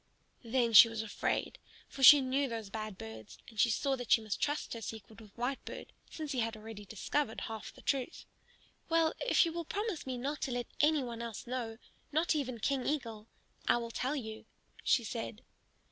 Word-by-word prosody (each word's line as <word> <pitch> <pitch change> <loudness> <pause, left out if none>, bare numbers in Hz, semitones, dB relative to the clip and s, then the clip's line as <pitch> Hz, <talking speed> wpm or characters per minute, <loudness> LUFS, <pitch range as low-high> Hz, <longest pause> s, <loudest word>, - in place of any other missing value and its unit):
Then 235 0 +1
she 230 +2 +11
was 225 -1 -3
afraid, 215 - -2 0.3
for 275 - -9
she 285 +2 +11
knew 270 +2 +1
those 225 -4 -5
bad 215 -2 -5
birds; 110 -1 -9
and 220 -2 -10
she 235 - +5
saw 270 +5 +1
that 245 -2 -6
she - - +7
must 215 -3 -4
trust 295 +1 -1
her 230 - -6
secret 220 0 -8
with 210 -2 -14
Whitebird, 245 +3 -4 0.2
since 310 -3 -5
he 260 - -1
had 225 -1 -1
already 215 -1 -9
discovered 220 +4 -2
half 220 -1 -6
the - - -17
truth. 270 +2 -2 0.6
"Well, 330 -1 +3
if - - +4
you 330 - -2
will 340 0 -3
promise 405 -2 -3
me 255 -1 -2
not 280 +4 -3
to 275 - -1
let 245 0 -2
any 300 -1 +4
one 235 -2 -5
else 230 -3 -6
know, 235 -3 -4 0.3
not 315 +4 +2
even 255 -5 -2
King 265 +3 0
Eagle, 230 -7 -3 0.4
I - - +5
will 235 -1 -4
tell 260 +5 -1
you," 220 -5 -6 0.4
she 240 - +3
said. 225 0 -5
240 Hz, 195 wpm, -33 LUFS, 220-280 Hz, 0.6 s, she